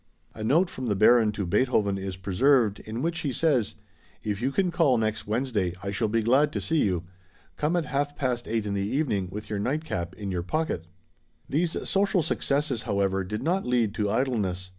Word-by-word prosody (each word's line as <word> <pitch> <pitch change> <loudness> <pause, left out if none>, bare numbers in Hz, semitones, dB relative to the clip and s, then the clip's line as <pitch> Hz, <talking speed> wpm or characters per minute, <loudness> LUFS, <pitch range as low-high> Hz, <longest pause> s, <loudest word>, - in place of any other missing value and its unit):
A 110 - -7
note 160 +11 +3
from 130 -6 -6
the 105 - +1
Baron 110 +2 +5
to 105 -2 -3
Beethoven 100 0 +1
is 95 -1 -5
preserved, 105 +4 +2
in 110 +4 -5
which 170 0 -1
he 145 -4 -2
says, 130 -6 +1 0.5
"If 105 0 -2
you 130 +3 +1
can 185 +4 +1
call 155 -7 +3
next 110 -1 -1
Wednesday 105 -6 -1
I 100 - -2
shall 110 +3 0
be 115 +1 +1
glad 135 +6 +4
to - - -1
see 160 -2 +1
you. 90 -4 0 0.5
Come 150 +4 0
at 170 -3 +1
half 145 0 -1
past 125 -4 -2
eight 110 -1 -1
in 100 - -2
the 100 - -1
evening 105 -3 0
with 105 +3 -7
your 105 -1 -3
nightcap 100 - -2
in 100 -2 -5
your 90 -2 -1
pocket." 90 - -2 0.6
These 165 +4 -1
social 195 -3 +2
successes, 140 -4 0
however, 95 -2 0
did 105 +5 -4
not 180 +5 +1
lead 120 -4 +2
to 105 -2 -1
idleness. 105 -6 -1
115 Hz, 200 wpm, -27 LUFS, 100-145 Hz, 0.6 s, Baron